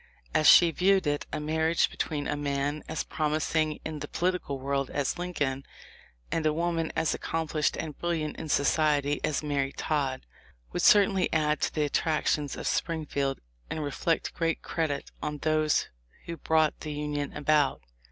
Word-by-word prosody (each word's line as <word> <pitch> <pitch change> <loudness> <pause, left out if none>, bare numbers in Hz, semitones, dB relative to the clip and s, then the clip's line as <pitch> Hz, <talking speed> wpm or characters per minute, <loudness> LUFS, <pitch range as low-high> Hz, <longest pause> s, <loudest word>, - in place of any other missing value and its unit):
As 155 - +4
she 170 -2 +8
viewed 190 +3 +3
it. 145 0 -1
a - - -2
marriage 160 +2 +1
between 145 -2 -3
a - - -1
man 145 +1 -2
as 160 - -2
promising 155 0 0
in 155 -1 -4
the - - -5
political 175 -5 -1
world 135 0 -1
as 145 +4 -2
Lincoln, 145 -7 -2 0.7
and 165 - 0
a 155 - +3
woman 165 0 -1
as 160 -1 +1
accomplished 160 -2 -1
and 155 -3 -5
brilliant 165 -3 -2
in 160 - -6
society 145 0 +2
as 155 0 0
Mary 140 -2 -1
Todd, 140 - -2 0.5
would - - -1
certainly 195 -2 +5
add 150 -2 +1
to - - 0
the 155 - +2
attractions 150 -1 0
of - - -6
Spring 160 -2 -1
field 140 -1 -2 0.3
and 155 - -3
reflect 155 +3 -1
great 165 -1 -1
credit 155 -4 -2
on 150 0 -3
those 155 0 +1 0.4
who 170 - -5
brought 160 -1 +1
the 155 -1 -5
union 145 -1 -3
about. 150 -1 +2
155 Hz, 160 wpm, -28 LUFS, 145-160 Hz, 0.7 s, she